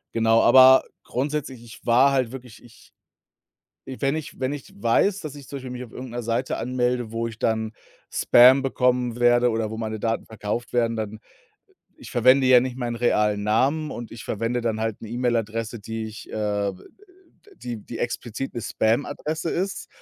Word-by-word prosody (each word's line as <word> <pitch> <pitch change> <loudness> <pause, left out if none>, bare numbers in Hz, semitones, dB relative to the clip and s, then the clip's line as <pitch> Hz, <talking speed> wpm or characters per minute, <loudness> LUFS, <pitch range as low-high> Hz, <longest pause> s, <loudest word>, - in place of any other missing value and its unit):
Genau, 115 0 +4
aber 130 +2 +7 0.2
grundsätzlich, 135 -2 -3
ich 115 -2 -14
war 125 +4 +5
halt 130 -4 0
wirklich 125 -4 -11
ich 120 -2 -19 0.9
wenn 135 +2 -2
ich 155 -3 -7
wenn 130 +2 -1
ich 145 - -9
weiß, 185 - +2
dass 155 -6 -7
ich 140 -2 -11
zum 140 - -6
Beispiel 130 -2 -8
mich 125 0 -6
auf 120 - -12
irgend 125 -1 -8
'ner 120 0 -4
Seite 115 +3 -1
anmelde, 125 -1 -1
wo 115 0 -2
ich 115 -1 -9
dann 110 0 -1 0.4
Spam 130 +3 +6
bekommen 125 -2 0
werde 120 0 +4
oder 110 -1 -1
wo 110 - -6
meine 110 -1 -4
Daten 115 +1 -1
verkauft 110 +2 -5
werden, 115 -1 +1
dann 110 -1 -5 0.8
ich 280 - -12
verwende 130 +2 +4
ja 125 -1 +8
nicht 130 0 -4
meinen 120 -2 -3
realen 105 -3 +1
Namen 135 +9 +1
und 120 -1 -7
ich 115 - -9
verwende 115 +3 -2
dann 110 -2 -2
halt 110 -2 -3
'ne 115 - -8
E-Mail-Adresse, 115 -2 -2
die 110 +2 -5
ich 110 0 -10
äh, 105 -2 -1 0.8
die 120 -2 -6
die 115 +2 -9
explizit 120 +2 -4
'ne 120 - -4
Spam-Adresse 145 +9 -1
ist, 190 +3 -3
120 Hz, 175 wpm, -24 LUFS, 115-130 Hz, 0.9 s, ja